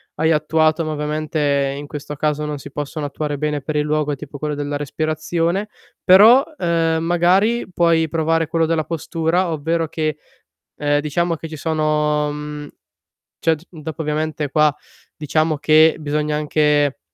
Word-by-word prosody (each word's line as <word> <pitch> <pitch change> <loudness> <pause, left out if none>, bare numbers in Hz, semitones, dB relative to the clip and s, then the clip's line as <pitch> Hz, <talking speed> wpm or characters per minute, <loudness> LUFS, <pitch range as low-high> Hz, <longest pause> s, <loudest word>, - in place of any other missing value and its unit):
hai 160 +2 +1
attuato, 155 +1 +2
ma 155 - -3
ovviamente, 150 -2 -1
in 145 0 -7
questo 150 0 -7
caso, 150 +1 -1
non 150 -1 -4
si 140 0 -11
possono 145 +1 -4
attuare 145 0 -3
bene 150 0 -1
per 150 +3 -4
il 150 - +2
luogo, 150 0 0
è - - -1
tipo 145 0 -9
quello 150 0 -3
della 145 0 -3
respirazione. 160 +6 -2 0.4
Però, 220 +8 +7
uhm, 165 -4 +1
magari 185 +7 +2
puoi 165 -2 +2
provare 165 0 0
quello 165 +1 +1
della 160 -1 0
postura, 165 +2 -1
ovvero 160 +2 -1
che 155 -1 -2 0.6
ehm, 145 0 +1
diciamo 165 +3 -1
che 160 - -8
ci 155 - -8
sono, 150 -1 0
mhmm 150 0 -7 0.7
cioè 165 - +2
d 155 +2 -13
dopo 160 -1 -8
ovviamente 155 -1 -2
qua 150 +1 +3 0.4
diciamo 155 0 0
che 155 +1 +5
bisogna 150 0 -1
anche 150 -1 +1
155 Hz, 160 wpm, -20 LUFS, 150-165 Hz, 0.7 s, Però